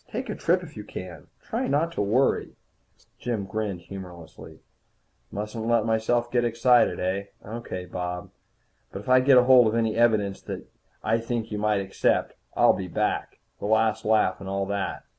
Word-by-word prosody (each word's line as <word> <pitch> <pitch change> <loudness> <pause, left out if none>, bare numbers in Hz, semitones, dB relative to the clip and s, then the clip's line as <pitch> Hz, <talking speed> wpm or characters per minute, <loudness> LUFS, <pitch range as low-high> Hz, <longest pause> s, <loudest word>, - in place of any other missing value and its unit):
Take - - -4
a - - -3
trip - - +1
if - - -11
you - - -7
can. 90 -2 -9 0.2
Try - - -2
not 150 +5 +1
to 170 - -2
worry." 115 +7 +1 0.6
Jim 115 -5 -2
grinned 100 -2 -3
humorlessly. 90 -3 -10 0.7
"Mustn't 110 +2 -4
let 120 0 +3
myself 115 +2 +1
get 120 -1 +2
excited, 120 +1 +3
eh? 95 +2 -1 0.2
Okay, 105 -4 -6
Bob. 90 0 -5 0.6
But 95 - -6
if - - -8
I 130 0 +7
get 130 0 +5
hold 125 -1 +7
of 110 - 0
any 115 -2 +1
evidence 110 -4 +2
that - - -7 0.4
I 115 +1 +2
think 115 -1 -3
you 105 - -3
might 105 -1 +1
accept, 95 0 0 0.2
I'll - - +5
be 95 - -4
back. 85 - -2 0.2
The - - -3
last 110 0 +2
laugh 105 -3 +2
and 95 - -6
all 100 0 -1
that. 100 0 -3
110 Hz, 175 wpm, -26 LUFS, 95-120 Hz, 0.7 s, I